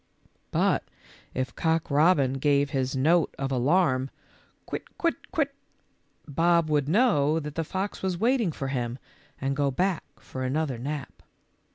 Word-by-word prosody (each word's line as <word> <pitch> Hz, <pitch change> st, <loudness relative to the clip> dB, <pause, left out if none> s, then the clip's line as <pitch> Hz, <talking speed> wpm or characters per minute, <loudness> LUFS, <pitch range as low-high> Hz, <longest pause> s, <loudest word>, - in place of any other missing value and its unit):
But -, -, +2 dB, 0.5 s
if 130 Hz, 0 st, -2 dB
Cock 160 Hz, -1 st, 0 dB
robin 140 Hz, -3 st, +4 dB
gave 140 Hz, 0 st, +2 dB
his 135 Hz, -2 st, -1 dB
note 160 Hz, +5 st, +3 dB
of 135 Hz, 0 st, -2 dB
alarm, 130 Hz, 0 st, +2 dB, 0.6 s
"Quit, -, -, -7 dB
quit, 335 Hz, -1 st, -2 dB
quit," 280 Hz, -3 st, 0 dB, 0.7 s
Bob 165 Hz, +2 st, +2 dB
would 145 Hz, -2 st, +2 dB
know 160 Hz, -, +3 dB
that 150 Hz, -2 st, -6 dB
the 165 Hz, -, -1 dB
fox 190 Hz, +5 st, -4 dB
was 185 Hz, -2 st, -1 dB
waiting 230 Hz, -2 st, +2 dB
for 135 Hz, -2 st, -4 dB
him, 120 Hz, -2 st, -2 dB, 0.4 s
and 135 Hz, +1 st, -1 dB
go 140 Hz, 0 st, +1 dB
back 180 Hz, +6 st, 0 dB, 0.2 s
for 130 Hz, -, -7 dB
another 135 Hz, -1 st, -1 dB
nap. 145 Hz, +2 st, -5 dB
150 Hz, 145 wpm, -27 LUFS, 135-175 Hz, 0.7 s, robin